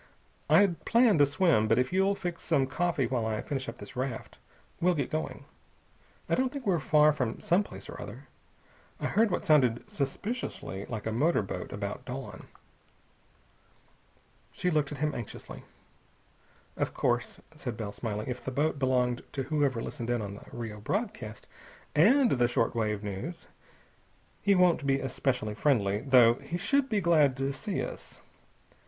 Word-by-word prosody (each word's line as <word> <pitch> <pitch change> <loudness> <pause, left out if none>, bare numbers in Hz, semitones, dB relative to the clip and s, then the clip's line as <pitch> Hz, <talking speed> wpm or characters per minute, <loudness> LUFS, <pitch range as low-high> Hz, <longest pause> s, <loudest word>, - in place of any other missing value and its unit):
"I'd 195 -4 +4
planned 230 -9 +4
a 145 - +6
swim. 145 - +3
But 115 - +3
if 125 +6 +1
you'll 195 +1 +3
fix 175 -3 -5
some 135 - +2
coffee 160 +1 0
while 120 -1 -1
I 110 -1 -1
finish 135 -2 -3
up - - -8
this 130 - -10
raft, 125 -2 -4 0.4
we'll 180 +1 +3
get 140 -4 -2
going. 155 +1 -3 0.8
I - - -1
don't 260 0 +2
think 280 -3 -6
we're 185 -5 +2
far 150 +1 +4
from 125 -6 -2
some 195 -2 +3
place - - -10
or - - -8
other. - - -9 0.7
I - - -3
heard 225 +1 +3
what - - -2
sounded 125 -6 +4
suspiciously 140 - -4
like 110 -3 -5
a 110 - -1
motor 145 +3 +2
boat, 95 - -6
about - - -4
dawn." - - -7 2.0
She 180 - -1
looked 150 -2 +1
at 145 - -5
him 150 +2 0
anxiously. 115 - -8 1.1
"Of - - -2
course," 120 0 0 0.2
said 125 -7 -5
Bell, 105 -3 -4
smiling, 105 0 -4
"if 125 - -4
the - - -3
boat 145 +3 0
belonged 125 -2 +1
to 135 - -2
whoever 140 -4 0
listened 120 -5 -5
in 120 -1 +1
on 100 -1 -5
the 100 - -11
Rio 110 -3 -6
broadcast 120 - -3 0.5
and 235 - +5
the 120 -2 +3
short 120 -1 +1
wave 105 -2 -1
news, 105 - -5 1.0
he 200 -1 +4
won't 175 -5 +3
be 135 0 +3
especially 125 -4 -1
friendly, 105 -5 +2
though 125 -3 +6
he 165 +5 -4
should 275 +8 +1
be 210 -3 +1
glad 155 -6 +4
to 135 +1 -1
see 205 +7 -3
us. - - -9
140 Hz, 165 wpm, -29 LUFS, 120-175 Hz, 2.0 s, a